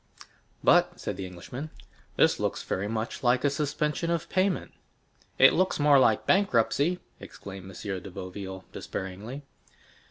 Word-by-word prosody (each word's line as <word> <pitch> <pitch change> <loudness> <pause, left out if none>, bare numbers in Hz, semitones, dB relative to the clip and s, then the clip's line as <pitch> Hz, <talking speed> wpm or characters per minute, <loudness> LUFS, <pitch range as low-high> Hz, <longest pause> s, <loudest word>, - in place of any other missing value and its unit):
"But," - - +4
said - - -4
the 95 - -5
Englishman, 120 - -7 0.5
"this - - +4
looks - - -2
very 95 +2 -2
much 110 +1 -3
like 125 0 +3
a 145 - +3
suspension 150 +3 -1
of 170 -2 -1
payment." 185 0 0 0.7
"It 135 - +8
looks 185 -2 +1
more 145 -1 +6
like 110 -4 +3
bankruptcy!" 175 - +2 0.2
exclaimed 95 -1 -10
M. 95 0 -5
de 100 - -9
Boville 95 +1 -7
despairingly. 105 +9 -6
120 Hz, 135 wpm, -28 LUFS, 95-150 Hz, 0.7 s, It